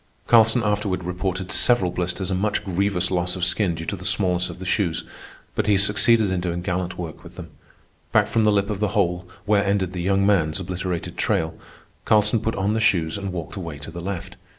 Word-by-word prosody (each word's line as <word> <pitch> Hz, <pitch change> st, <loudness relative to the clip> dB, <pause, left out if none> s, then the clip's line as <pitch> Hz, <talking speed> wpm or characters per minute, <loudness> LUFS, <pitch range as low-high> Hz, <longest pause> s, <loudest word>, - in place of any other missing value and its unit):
Carlson 115 Hz, +1 st, +5 dB
afterward 100 Hz, -3 st, 0 dB
reported 90 Hz, +1 st, -3 dB
several 105 Hz, -8 st, +3 dB
blisters 90 Hz, +2 st, -3 dB
and 95 Hz, -, 0 dB
much 105 Hz, 0 st, -1 dB
grievous 95 Hz, -1 st, 0 dB
loss 90 Hz, 0 st, 0 dB
of 90 Hz, -1 st, 0 dB
skin 90 Hz, -1 st, +1 dB
due 80 Hz, 0 st, -6 dB
to -, -, -2 dB
the -, -, -10 dB
smallness 90 Hz, -1 st, +1 dB
of -, -, -8 dB
the 95 Hz, -, -8 dB
shoes, 90 Hz, -3 st, 0 dB, 0.5 s
but -, -, -1 dB
he 105 Hz, -2 st, +4 dB
succeeded 105 Hz, +1 st, +3 dB
in 90 Hz, -1 st, -1 dB
doing 85 Hz, 0 st, -3 dB
gallant 90 Hz, -1 st, -2 dB
work 85 Hz, -3 st, -7 dB
with -, -, -13 dB
them. -, -, -9 dB, 0.6 s
Back -, -, +4 dB
from 115 Hz, -, +1 dB
the 105 Hz, -, +4 dB
lip 100 Hz, 0 st, +1 dB
of 100 Hz, -, -3 dB
the 105 Hz, 0 st, -1 dB
hole, 90 Hz, -2 st, 0 dB, 0.2 s
where 105 Hz, 0 st, +3 dB
ended 100 Hz, -2 st, 0 dB
the 90 Hz, -, -3 dB
young 100 Hz, +2 st, +2 dB
man's 90 Hz, -4 st, +2 dB
obliterated 90 Hz, -1 st, -4 dB
trial, 80 Hz, 0 st, 0 dB, 0.5 s
Carlson 105 Hz, +1 st, +3 dB
put 110 Hz, +1 st, -2 dB
on 100 Hz, +2 st, 0 dB
the 110 Hz, -, 0 dB
shoes 85 Hz, -7 st, +2 dB
and 100 Hz, -1 st, -4 dB
walked 85 Hz, -3 st, -6 dB
away 85 Hz, -6 st, -6 dB
to 75 Hz, +3 st, -9 dB
the 85 Hz, +1 st, -7 dB
left. 95 Hz, -1 st, -5 dB
95 Hz, 215 wpm, -23 LUFS, 90-105 Hz, 0.6 s, Carlson